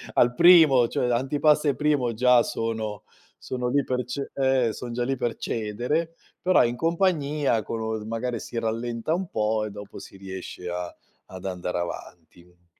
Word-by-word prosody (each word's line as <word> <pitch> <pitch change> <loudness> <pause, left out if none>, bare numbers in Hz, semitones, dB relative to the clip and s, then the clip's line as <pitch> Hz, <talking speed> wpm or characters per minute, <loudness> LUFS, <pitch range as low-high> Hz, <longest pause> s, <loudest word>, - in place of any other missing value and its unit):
al 120 0 +4
primo, 160 -9 +7
cioè 125 - 0
antipasto 145 +4 +2
e 140 - 0
primo, 145 -6 +1
già 125 +1 +4
sono 110 -2 -3 0.4
sono 125 -1 -3
lì 140 +1 +2
per 125 0 -2
ce 135 +3 -5
ehm, 130 -4 +2
sono 120 +3 -7
già 120 +1 -2
lì 135 +2 -1
per 120 -2 -2
cedere, 125 +10 -2 0.3
però 185 -8 +4
in 120 +1 -1
compagnia 155 - +1
con 115 - -4
u 110 -1 -3
magari 115 +1 -3
si 120 - -8
rallenta 115 +5 -2
un 185 +1 -2
po', 110 0 0
e 105 - -6
dopo 105 0 -10
si 95 - -12
riesce 95 -2 -8
a 90 0 -5 0.3
ad 95 0 -10
andare 90 -1 -3
avanti. 85 0 -9
120 Hz, 170 wpm, -25 LUFS, 105-140 Hz, 0.4 s, primo